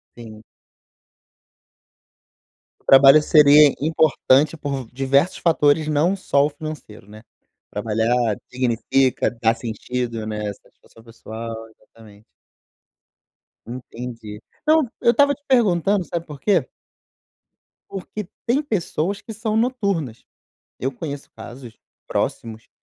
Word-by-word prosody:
Sim. 110 -2 -12 2.4
O - - -35
trabalho 135 +2 +7
seria 150 -1 +6
importante 155 -1 +2
por 140 -5 -4
diversos 135 +6 +1
fatores, 155 -2 +2
não 155 +6 +1
só 145 -7 +1
o - - -1
financeiro, 145 -9 -9
né? 110 +1 -13 0.5
Trabalhar 110 +2 0 0.2
dignifica, 130 +1 0
da 115 0 +3
sentido, 115 0 -4
né? 105 -1 -3
Satisfação 110 +3 -23
pessoal. 115 0 -8
Exatamente! 110 -1 -19 1.4
Entendi. 115 -3 -8 0.2
Não, 315 +1 +5 0.2
eu 235 - +5
estava 285 +3 +3
te 285 +1 -15
perguntando, 200 -6 +2
sabe 170 0 -5
por 150 -3 -10
quê? 180 -8 +2 1.2
Porque 195 +1 -7 0.2
tem 255 +5 +1
pessoas 195 - -2
que 225 - -9
são 215 0 -3
noturnas. 200 - -1 0.6
Eu 135 +2 -2
conheço 140 +2 -7
casos, 120 -2 -11 0.3
próximos, 110 -1 -4
140 Hz, 105 wpm, -21 LUFS, 115-170 Hz, 2.4 s, trabalho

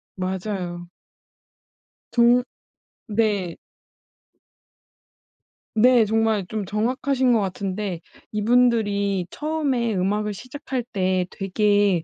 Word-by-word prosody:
맞아요. 185 -2 -4 1.2
종 240 +1 +5 0.7
네. 205 -5 0 2.2
네. 240 +1 +5
정말 220 -2 +1
좀 215 -1 -3
정확하신 250 +5 +1
것 230 - +4
같은데 195 -2 -3 0.3
이분들이 210 -4 +2
처음에 285 -7 -1
음악을 210 +3 0
시작할 255 +3 -5
때 185 -5 0
되게 205 -2 +2
210 Hz, 165 characters per minute, -23 LUFS, 190-235 Hz, 2.2 s, 종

